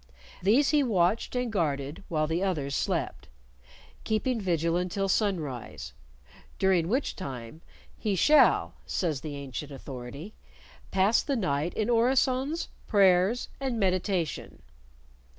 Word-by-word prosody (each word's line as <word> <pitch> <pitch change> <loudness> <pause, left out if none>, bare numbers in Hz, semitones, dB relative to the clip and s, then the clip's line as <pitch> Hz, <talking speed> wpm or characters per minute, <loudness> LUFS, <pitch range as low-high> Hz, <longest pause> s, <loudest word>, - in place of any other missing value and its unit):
These 235 +10 +4
he 300 -1 +4
watched 215 -2 +1
and 250 -2 -1
guarded 145 -6 -2
while 155 -2 +1
the 165 +3 -1
others 155 -8 -1
slept, - - -2 0.8
keeping 225 +2 0
vigil 170 -3 0
until 180 +2 -1
sunrise, 165 - -2 0.6
during 185 -4 +2
which 255 +9 -1
time 130 -2 -7 0.4
"he 210 -3 0
shall," 300 - +4
says 155 -7 -1
the 150 -2 -6
ancient 140 +1 -6
authority, 135 - -8 0.6
"pass 195 +4 +3
the 280 - -1
night 155 - -1
in 215 - 0
orisons, 260 +5 +1 0.2
prayers, 195 +2 +3
and 260 -4 -2
meditation." 185 -3 -1
185 Hz, 115 wpm, -28 LUFS, 155-225 Hz, 0.8 s, These